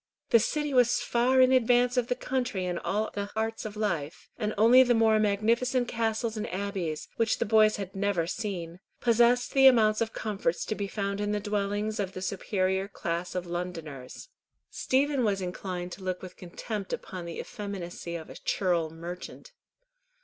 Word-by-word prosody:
The 230 Hz, -, +7 dB
City 295 Hz, +5 st, -1 dB
was 245 Hz, -2 st, +4 dB
far 255 Hz, +2 st, +3 dB
in 255 Hz, 0 st, +6 dB
advance 245 Hz, 0 st, +4 dB
of 245 Hz, -2 st, +1 dB
the 250 Hz, -, 0 dB
country 250 Hz, -7 st, -2 dB
in 180 Hz, -1 st, -2 dB
all 215 Hz, +2 st, -1 dB
the 200 Hz, 0 st, -3 dB
arts 225 Hz, 0 st, -2 dB
of 215 Hz, -1 st, -6 dB
life, 170 Hz, -8 st, -3 dB
and 215 Hz, -2 st, -2 dB
only 235 Hz, +5 st, +7 dB
the 245 Hz, -2 st, +4 dB
more 220 Hz, -1 st, +4 dB
magnificent 230 Hz, +5 st, +1 dB
castles 225 Hz, -1 st, -1 dB
and 215 Hz, 0 st, -4 dB
abbeys, 185 Hz, -5 st, -3 dB
which 230 Hz, -1 st, +2 dB
the -, -, 0 dB
boys 215 Hz, 0 st, +5 dB
had 195 Hz, -2 st, -6 dB
never 195 Hz, -4 st, 0 dB
seen, 180 Hz, -3 st, -4 dB, 0.2 s
possessed 240 Hz, +1 st, +3 dB
the 270 Hz, -1 st, +7 dB
amount 215 Hz, -4 st, +5 dB
of 225 Hz, -1 st, 0 dB
comforts 200 Hz, -7 st, -2 dB
to -, -, -2 dB
be 200 Hz, -1 st, -3 dB
found 200 Hz, 0 st, -3 dB
in 205 Hz, 0 st, -1 dB
the 210 Hz, -, 0 dB
dwellings 205 Hz, +1 st, -2 dB
of 190 Hz, -2 st, -2 dB
the 185 Hz, -, -6 dB
superior 190 Hz, 0 st, -1 dB
class 175 Hz, -2 st, -4 dB
of 180 Hz, -1 st, -2 dB
Londoners. 170 Hz, -, -6 dB, 0.4 s
Stephen 275 Hz, 0 st, +1 dB
was 205 Hz, -3 st, +1 dB
inclined 180 Hz, -1 st, -5 dB
to 190 Hz, -, -9 dB
look 185 Hz, -1 st, -3 dB
with 185 Hz, -, -9 dB
contempt 195 Hz, +3 st, -6 dB
upon 180 Hz, -2 st, -5 dB
the 170 Hz, -1 st, -6 dB
effeminacy 180 Hz, -4 st, -6 dB
of 160 Hz, -2 st, -6 dB
a -, -, -9 dB
churl 175 Hz, -4 st, 0 dB
merchant. 175 Hz, -, -8 dB
205 Hz, 180 wpm, -28 LUFS, 180-230 Hz, 0.4 s, The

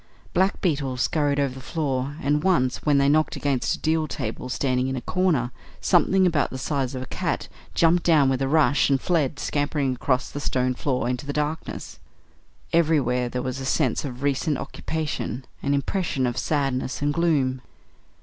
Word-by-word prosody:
Black 190 Hz, +2 st, +2 dB
beetles 140 Hz, -8 st, 0 dB
scurried 145 Hz, -2 st, +1 dB
over 140 Hz, -2 st, +1 dB
the 130 Hz, -, -9 dB
floor, 135 Hz, -1 st, -2 dB
and 150 Hz, +2 st, +2 dB
once, 130 Hz, -10 st, +2 dB
when 145 Hz, -2 st, +3 dB
they 140 Hz, 0 st, +4 dB
knocked 155 Hz, +2 st, +2 dB
against 140 Hz, -4 st, 0 dB
a -, -, -11 dB
deal 160 Hz, 0 st, 0 dB
table 125 Hz, -2 st, -5 dB
standing 130 Hz, 0 st, 0 dB
in 130 Hz, -, -2 dB
a 125 Hz, -, -3 dB
corner, 160 Hz, -10 st, +1 dB, 0.3 s
something 190 Hz, 0 st, +3 dB
about 160 Hz, -5 st, +2 dB
the 130 Hz, -, -6 dB
size 135 Hz, -1 st, -2 dB
of 130 Hz, -, -4 dB
a -, -, -6 dB
cat -, -, -2 dB, 0.3 s
jumped 170 Hz, +1 st, +4 dB
down 155 Hz, -5 st, +4 dB
with 135 Hz, 0 st, +1 dB
a 135 Hz, -, +1 dB
rush 145 Hz, -2 st, +3 dB
and 135 Hz, -1 st, +3 dB
fled, 155 Hz, -4 st, 0 dB
scampering 145 Hz, -2 st, 0 dB
across 125 Hz, 0 st, -1 dB
the 145 Hz, -, -5 dB
stone 130 Hz, -2 st, 0 dB
floor 130 Hz, -1 st, -1 dB
into 125 Hz, +3 st, -3 dB
the -, -, -1 dB
darkness. 150 Hz, +2 st, -4 dB, 0.7 s
Everywhere 140 Hz, -7 st, +2 dB
there 125 Hz, 0 st, -3 dB
was 130 Hz, +1 st, -3 dB
a -, -, -5 dB
sense 130 Hz, -2 st, +1 dB
of 130 Hz, -2 st, -6 dB
recent 145 Hz, +1 st, +1 dB
occupation, 145 Hz, -6 st, -4 dB, 0.2 s
an 140 Hz, 0 st, +1 dB
impression 140 Hz, -2 st, -1 dB
of 120 Hz, -1 st, -1 dB
sadness 135 Hz, -1 st, -1 dB
and 145 Hz, 0 st, +1 dB
gloom. 145 Hz, -6 st, +1 dB
140 Hz, 180 wpm, -24 LUFS, 130-155 Hz, 0.7 s, they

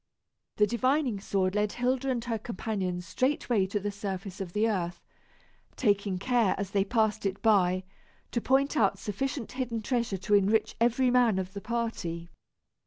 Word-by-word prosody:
The 210 Hz, -, +4 dB
divining 255 Hz, 0 st, +1 dB
sword 190 Hz, -1 st, 0 dB
led 210 Hz, 0 st, 0 dB
Hilda 255 Hz, +2 st, 0 dB
and 245 Hz, -3 st, -1 dB
her 230 Hz, -2 st, -2 dB
companions 190 Hz, -5 st, -3 dB
straightway 235 Hz, -, +1 dB
to 205 Hz, +2 st, -1 dB
the 205 Hz, +1 st, -3 dB
surface 195 Hz, -1 st, -5 dB
of 175 Hz, -3 st, -6 dB
the 215 Hz, +2 st, +2 dB
earth, 175 Hz, -5 st, -2 dB, 0.8 s
taking 200 Hz, -4 st, +1 dB
care, 230 Hz, +1 st, +2 dB
as 200 Hz, -1 st, -4 dB
they 200 Hz, -1 st, +2 dB
passed 220 Hz, 0 st, +1 dB
it 195 Hz, -1 st, -1 dB
by, 185 Hz, -4 st, +3 dB, 0.5 s
to 235 Hz, -, -1 dB
point 275 Hz, +4 st, +2 dB
out 200 Hz, -6 st, +3 dB
sufficient 230 Hz, +5 st, -3 dB
hidden 245 Hz, -4 st, -3 dB
treasure 235 Hz, -4 st, 0 dB
to 190 Hz, +3 st, -2 dB
enrich 205 Hz, +2 st, +3 dB
every 245 Hz, +2 st, +3 dB
man 245 Hz, -5 st, +4 dB
of 190 Hz, 0 st, -3 dB
the 200 Hz, -, -6 dB
party. 185 Hz, -8 st, -3 dB
210 Hz, 165 wpm, -29 LUFS, 195-240 Hz, 0.8 s, The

